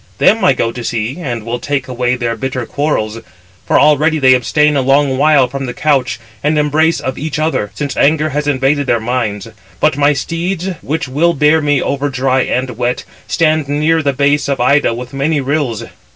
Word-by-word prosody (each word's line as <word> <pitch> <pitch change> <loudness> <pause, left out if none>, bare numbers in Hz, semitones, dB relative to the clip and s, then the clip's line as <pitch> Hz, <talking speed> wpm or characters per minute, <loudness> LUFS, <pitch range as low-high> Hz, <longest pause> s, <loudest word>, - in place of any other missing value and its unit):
Them 225 -1 +3
I 180 - +5
go 115 -2 -1
to 120 0 -7
see, 115 +4 -3
and 120 -9 -4
will 120 +1 -3
take 140 -1 -2
away 125 0 -1
their 120 -2 -2
bitter 130 -1 -4
quarrels. 115 -7 -2 0.5
For - - +3
already 150 +2 +3
they 130 -3 +5
abstain 150 +4 +2
a 140 - +2
long 135 +1 +2
while 145 -1 +4
from 135 +1 -5
the 125 - -6
couch 135 -6 0 0.2
and 150 +1 +1
embrace 155 +2 +2
of 130 - -4
each 150 -1 -3
other; 155 -9 -1
since 140 +2 -4
anger 155 +1 +2
has 150 0 -2
invaded 140 0 +1
their 120 - +2
minds. 110 -3 -2 0.3
But 150 -3 +2
my 145 +1 +3
steeds, 170 +5 -3
which 155 +1 -3
will 165 +6 +1
bear 150 +2 +3
me 145 -2 +1
over 140 +1 -1
dry 130 0 +1
and 125 -1 -2
wet, 125 0 -1 0.2
stand 155 -3 +1
near 155 +3 +1
the 140 -2 +1
base 145 +2 +1
of 140 - -1
Ida 130 -1 +2
with 125 +2 -8
many 145 +3 0
rills. 135 -5 -2
140 Hz, 195 wpm, -15 LUFS, 125-150 Hz, 0.5 s, I